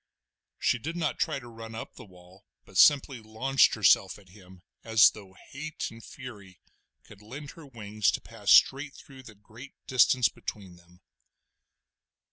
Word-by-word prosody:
She 120 - 0
did 160 +8 -6
not 160 -3 -2
try 155 -4 -1
to 125 -3 -11
run 115 -1 -10
up 115 - -8
the - - -13
wall, 90 0 -19 0.2
but - - -19
simply 140 -3 +4
launched 115 +5 +1
herself 100 -2 +3
at 100 -3 -20
him 95 -2 -17 0.2
as 110 -2 +5
though 95 -3 -14 0.2
hate 155 +3 -6
and 115 0 -14
fury 105 -8 -12 0.4
could 100 -1 -17
lend 135 +7 -10
her 165 -3 -14
wings 110 -5 -2
to - - -2
pass 110 -3 -8
straight 140 +5 +4
through 135 -1 -14
the 110 -4 -14
great 115 +6 -14
distance 125 -2 +3
between 95 -1 -9
them. 85 +1 -23
110 Hz, 160 wpm, -27 LUFS, 100-135 Hz, 0.4 s, as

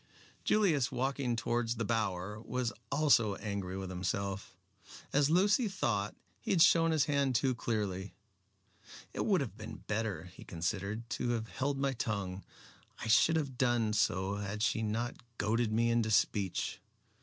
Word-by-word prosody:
Julius, 165 - +3
walking 130 -1 -1
towards 120 0 0
the 115 -1 -2
Bower, 105 -2 -1
was 125 0 -2 0.2
also 135 -9 +4
angry 100 -3 -4
with 95 -1 -5
himself. 95 +1 -3 0.6
As 145 0 +4
Lucy 205 +8 +4
thought, 110 - -1 0.2
he - - -8
had 170 -4 +6
shown 165 -1 +5
his 160 -3 +3
hand 140 -3 +1
too 130 +2 +2
clearly. 100 -5 -3 1.0
"It - - -2
would - - +3
have - - -4
been - - -9
better," 105 -6 -2
he - - -12
considered, 100 +6 -3
"to 125 - -1
have 110 -2 -3
held 140 +1 -1
my 135 0 0
tongue. 100 -5 -3 0.6
I - - -5
should 160 +8 +5
have 140 -6 -2
done 120 -4 +2
so 100 -1 +1
had 105 +1 -3
she 115 - +1
not 115 +3 -2 0.2
goaded 110 +1 +1
me 115 +2 +2
into 115 -1 +2
speech. 100 -2 +1
115 Hz, 155 wpm, -33 LUFS, 100-130 Hz, 1.0 s, had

